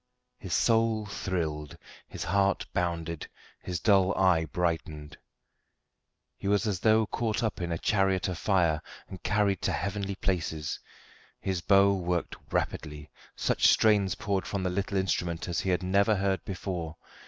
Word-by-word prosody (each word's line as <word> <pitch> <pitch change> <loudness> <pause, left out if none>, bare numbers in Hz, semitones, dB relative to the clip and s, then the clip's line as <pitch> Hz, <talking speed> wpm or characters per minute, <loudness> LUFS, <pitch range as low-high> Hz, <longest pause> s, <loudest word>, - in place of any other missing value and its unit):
His 90 -5 -2
soul 115 +1 +2
thrilled, 80 -7 -3 0.3
his - - -6
heart 100 +3 +1
bounded, 85 -2 -2 0.3
his 90 -2 -3
dull 95 -1 +3
eye 90 -4 +4
brightened. 80 -2 -3 1.2
He - - -6
was 100 +2 +2
as 100 -5 -1
though 110 +3 +4
caught 110 +2 -2
up 110 -4 -2
in 85 -1 -2
a 85 - -1
chariot 95 0 +1
of 90 -2 -4
fire 85 -6 +2 0.3
and 95 - -9
carried 105 -3 +1
to - - 0
heavenly 100 -1 -2
places. 80 -6 -2 0.6
His 95 -3 -2
bow 100 +1 +5
worked 90 -2 -2 0.2
rapidly, 75 -2 -3 0.2
such - - +2
strains 105 -3 +4
poured 100 -2 -2
from 100 -2 -2
the 90 - 0
little 100 +2 -1
instrument 85 -3 -1
as 85 - -1
he 95 - -2
had 90 0 +1
never 100 +4 +3
heard 95 -2 0
before. 90 -4 -4
95 Hz, 150 wpm, -29 LUFS, 85-100 Hz, 1.2 s, bow